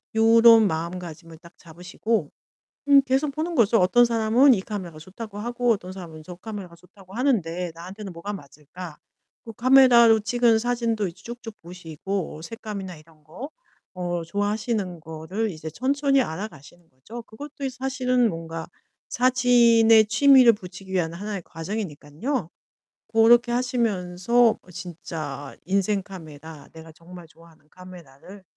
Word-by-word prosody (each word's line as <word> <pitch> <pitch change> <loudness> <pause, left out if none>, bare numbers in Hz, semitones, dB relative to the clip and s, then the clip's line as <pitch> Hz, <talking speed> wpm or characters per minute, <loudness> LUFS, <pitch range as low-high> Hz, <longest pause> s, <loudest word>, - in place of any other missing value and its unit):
요런 225 -1 +6
마음가짐을 165 -1 -6
딱 170 -1 -17
잡으시고. 180 +2 -4 0.6
음 280 -1 +8
계속 270 +2 0
보는 320 +3 -4
거죠. 230 -1 +4
'어떤 240 +7 +4
사람은 235 +4 +4
이 190 - -1
카메라가 185 -7 -7
좋다고 205 +5 -9
하고 240 +1 0
어떤 185 -4 -2
사람은 170 -4 -10
저 180 +2 -10
카메라가 190 -2 -9
좋다고 185 +2 -19
하는데 180 - -1
나한테는 190 +3 -9
뭐가 170 +5 -6
맞을까?' 150 +1 -11 0.5
그 225 - -9
카메라로 240 -3 +6
찍은 240 0 +2
사진도 235 -3 -1
이제 185 +3 -11
쭉쭉 235 -2 -9
보시고 175 0 -6
색감이나 200 -4 -7
이런 155 0 -21
거. 185 - -9 0.5
어 175 -2 -3
좋아하시는 205 0 -2
거를 165 +7 -4
이제 160 -1 -8
천천히 275 - +1
알아가시는 170 - -8
거죠. 215 - -10
그것도 280 +5 -9
이 - - -1
사실은 255 -1 0
뭔가 165 -2 -6 0.4
사진에 240 -3 +4
취미를 255 +1 +6
붙이기 190 -1 -11
위한 170 -3 -1
하나의 200 0 -6
과정이니깐요. 165 - -5 0.6
그렇게 235 +2 +5
하시면서 230 -2 +1
어 180 - -18
진짜 155 -5 -7
인생 195 +1 0
카메라. 160 -5 -11
내가 160 0 -12
정말 175 +2 -13
좋아하는 165 -2 -21
카메라를 180 +1 -14
195 Hz, 335 characters per minute, -24 LUFS, 170-235 Hz, 0.6 s, 음